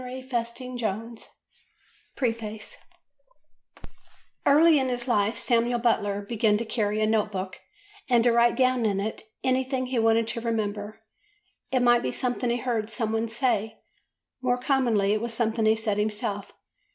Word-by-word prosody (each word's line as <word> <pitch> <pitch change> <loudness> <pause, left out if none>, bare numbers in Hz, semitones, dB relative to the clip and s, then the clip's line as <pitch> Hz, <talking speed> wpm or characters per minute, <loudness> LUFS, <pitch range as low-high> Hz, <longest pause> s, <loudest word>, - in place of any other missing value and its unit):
PRINTERS, 250 -2 -4
PLYMOUTH 235 -3 -5 0.9
Preface 225 -4 -3 1.7
EARLY 305 +2 +6
in 260 -1 0
his 245 0 -2
life 215 -1 +1
Samuel 235 0 +1
Butler 205 -4 +1
began 215 0 +1
to 230 - -3
carry 215 -2 -1
a - - +3
note 215 -1 +1
book 190 -1 -5 0.5
and 240 -2 +4
to 240 - +4
write 235 0 +4
down 255 -2 +2
in 200 -3 +1
it 215 +2 -3 0.2
anything 260 0 0
he 250 -1 -1
wanted 225 0 +3
to 230 - -3
remember; 215 -1 -3 0.7
it 255 - +2
might 240 -1 +5
be - - -2
something 250 -1 -1
he 240 - +1
heard 230 -3 -2
some 220 -1 -2
one 225 +1 -1
say, 225 -2 -1 0.6
more 250 -1 +1
commonly 245 -6 +2
it 215 - -1
was 235 -1 -3
something 225 -1 +1
he 220 - +5
said 215 -2 -1
himself. 210 -1 -2
230 Hz, 150 wpm, -26 LUFS, 215-245 Hz, 1.7 s, EARLY